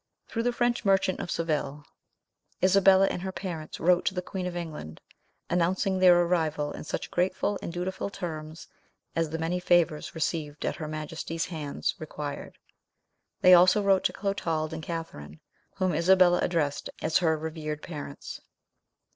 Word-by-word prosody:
Through 230 - -2
the 245 +1 +1
French 240 0 0
merchant 195 -2 +2
of - - -5
Seville, 150 -4 -2 0.8
Isabella 190 0 +6
and 180 - -2
her 190 0 -3
parents 170 -5 -6
wrote 175 +1 +3
to 190 - 0
the 180 - -1
queen 185 -1 -4
of 180 - -5
England, 155 - -6 0.5
announcing 185 +3 +1
their 180 -1 +7
arrival 160 -4 0
in - - -7
such - - -5
grateful 185 +3 0
and - - -5
dutiful 180 +3 -3
terms 160 -4 -7 0.5
as 165 -1 0
the 160 - -3
many 165 +2 -1
favours 175 -4 +2
received 155 -2 -2
at - - -2
her 155 - -5
Majesty's 155 +2 -4
hands 150 -3 -2
required. 150 -2 -6 0.8
They 185 - +8
also 180 +4 +6
wrote 195 -1 +3
to - - +3
Clotald 165 -6 -2
and 160 - -5
Catherine, 115 - -7 0.4
whom 185 -2 0
Isabella 180 +2 +5
addressed 155 -5 -1
as 155 0 +3
her 160 -3 +2
revered 155 -1 -5
parents. 145 -4 -7
170 Hz, 155 wpm, -28 LUFS, 155-185 Hz, 0.8 s, They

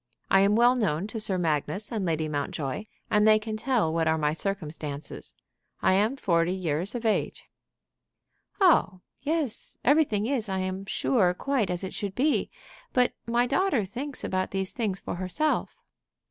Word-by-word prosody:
I 195 - +6
am 200 +2 +4
well 240 +2 +5
known 195 -8 0
to 220 +2 -5
Sir 195 -3 0
Magnus 175 - -1
and 220 -4 -2
Lady 160 -3 0
Mountjoy, 145 +4 -3 0.3
and 210 0 +4
they 215 0 +7
can 215 0 -4
tell 215 -8 +1
what 165 -1 +1
are 160 0 +2
my 150 -1 +1
circumstances. 155 - -5 0.5
I - - +4
am 210 +7 +2
forty 170 -7 +1
years 180 +4 -1
of 235 -1 -4
age." 220 - 0 1.2
"Oh 300 - +4 0.2
yes; 295 -4 -1
everything 265 -8 +3
is, 235 -4 -1
I 190 - -1
am 185 +1 -3
sure, 190 -6 +2
quite 260 -4 0
as 180 +1 -1
it 190 - -5
should 200 -2 -4
be. 290 +4 +1 0.4
But 250 -1 +3
my 240 +1 +2
daughter 275 - +1
thinks 260 +8 -5
about 185 0 -1
these 190 -1 -3
things 210 -6 -2
for - - -5
herself." 190 - -1
200 Hz, 165 wpm, -27 LUFS, 180-240 Hz, 1.2 s, they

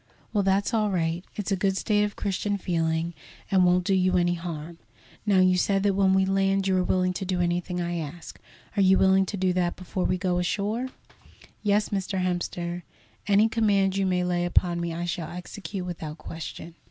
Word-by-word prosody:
"Well, 205 -2 +2
that's 195 +4 +1
all 215 -2 +2
right. 170 -2 -1
It's 210 -1 -3
a - - +3
good 195 0 0
state 210 0 +2
of 205 0 -2
Christian 200 +1 -1
feeling 165 -2 -1 0.4
and 190 -2 +5
won't 180 0 +4
do 195 - +1
you 185 -1 +3
any 175 0 +2
harm. 170 -1 -6 0.5
Now 195 -2 +5
you 185 0 +4
said 195 +1 +1
that 200 -1 +3
when 190 -1 +3
we 190 0 +3
land 195 0 +1
you 190 - +2
are 185 - +2
willing 185 0 +1
to 185 - -4
do 185 -1 -1
anything 175 +1 -1
I 175 0 -2
ask. 160 +2 -8 0.4
Are 205 - +2
you 190 0 +5
willing 190 0 +4
to 205 - -4
do 185 -1 +1
that 175 -1 0
before 185 0 -3
we 185 - +1
go 180 -1 0
ashore?" 210 +7 -1 0.7
"Yes, 210 0 +2
Mr. 195 -1 -2
Hemster, 175 -1 -2 0.5
any 205 +2 +5
command 205 -4 +2
you 195 -1 +1
may 180 -1 +1
lay 175 -1 0
upon 175 0 +1
me 170 0 -2
I 170 +1 -3
shall 170 -2 -3
execute 180 +2 -6
without 160 -3 -6
question." 165 +1 -8
185 Hz, 200 wpm, -26 LUFS, 175-195 Hz, 0.7 s, and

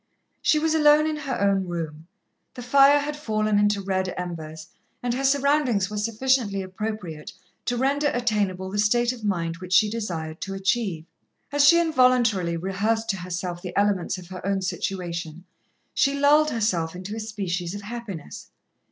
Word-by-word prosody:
She 310 - +3
was 320 +1 +1
alone 300 -1 +5
in 310 0 -1
her 275 -4 -3
own 195 -2 +2
room, 160 -2 -5 0.5
the 245 - -7
fire 275 +3 +6
had 290 +1 -2
fallen 215 -7 0
into 205 -1 +2
red 190 -1 -1
embers, 160 -3 -6 0.3
and 245 -1 0
her 265 +2 -2
surroundings 275 -7 +2
were 210 - -4
sufficiently 225 -2 0
appropriate 185 -3 -6 0.3
to 245 - -1
render 280 +3 +1
attainable 205 -7 -1
the 205 - -2
state 240 +4 +2
of 235 -3 -11
mind 170 -5 -1
which 185 0 -6
she 210 +2 +5
desired 170 -8 -4
to 195 -1 -4
achieve. 195 -4 -1 0.5
As 290 0 +4
she 340 - +6
involuntarily 250 - +3
rehearsed 215 +5 -1
to 195 - -5
herself 180 -1 -5
the 180 - -6
elements 200 -3 +1
of 180 -1 -11
her 185 -1 -8
own 195 0 -1
situation, 175 -3 -4 0.5
she 275 0 +2
lulled 300 +2 +5
herself 180 - -1
into 185 +4 -6
a - - -5
species 195 -4 -3
of 205 - -7
happiness. 205 - -8
205 Hz, 165 wpm, -24 LUFS, 180-245 Hz, 0.5 s, fire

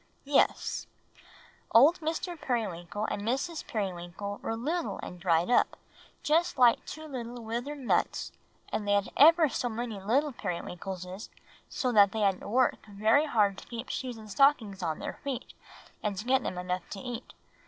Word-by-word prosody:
"Yes; 280 0 +1 0.9
old 290 +10 +7
Mr. 330 +2 -3
Periwinkle 210 - -3
and - - -2
Mrs. 270 +9 -2
Periwinkle 195 0 -4
were 225 - -2
little 310 +9 -2
and 180 - -7
dried 175 +3 +2
up, - - +3 0.5
just 335 +3 +2
like 245 -2 +5
two 315 +1 -7
little 245 -4 -6
withered 240 +6 -4
nuts; 265 -4 0 0.4
and 210 - -3
they 205 - +3
had 200 -1 +2
ever 325 +2 +7
so 245 -1 -2
many 230 -2 -4
little 265 +9 +1
Periwinkleses, 185 0 -5
and - - -33 0.4
so 255 - -1
they 210 -1 +5
had 195 -2 +2
to - - -9
work 245 +4 +2
very 220 +9 +3
hard 205 -7 +2
to - - -14
keep 235 +1 -6
shoes 250 -3 -4
and 215 -1 -11
stockings 230 -7 +3
on 160 -3 -1
their - - -6
feet, 275 -3 -4 0.5
and 205 -2 -2
to 210 - -5
get 260 +1 +3
them 180 - -4
enough 180 0 -3
to 200 - -6
eat. 245 0 -7
230 Hz, 165 wpm, -29 LUFS, 200-270 Hz, 0.9 s, old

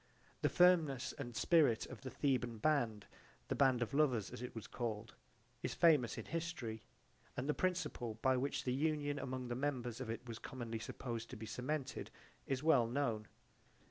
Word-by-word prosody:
The - - +3
firmness 165 -8 +4
and 120 -4 -5
spirit 150 -9 +4
of 130 - -9
the 130 - -5
Theban 125 -5 0
band 110 -6 +1 0.4
the - - +1
band 130 -3 +4
of 120 - -6
lovers 130 -9 +2
as - - -7
it 125 - -6
was 115 - -5
called 110 -2 -4 0.5
is - - -2
famous 150 -9 +5
in - - -5
history; 160 -10 -3 0.6
and 125 - -2
the 150 - +3
principle 175 -12 -1
by 130 -1 +5
which 135 +3 -1
the 125 - 0
union 145 0 0
among 130 -2 -4
the - - -1
members 125 -3 -2
of 125 - -4
it 115 +2 -4
was 115 -1 -6
commonly 120 -3 -5
supposed 115 0 -5
to - - -7
be 110 - -6
cemented 130 +5 -3 0.4
is 135 0 -1
well 140 -8 +5
known. 115 -5 -1
130 Hz, 175 wpm, -38 LUFS, 115-145 Hz, 0.6 s, famous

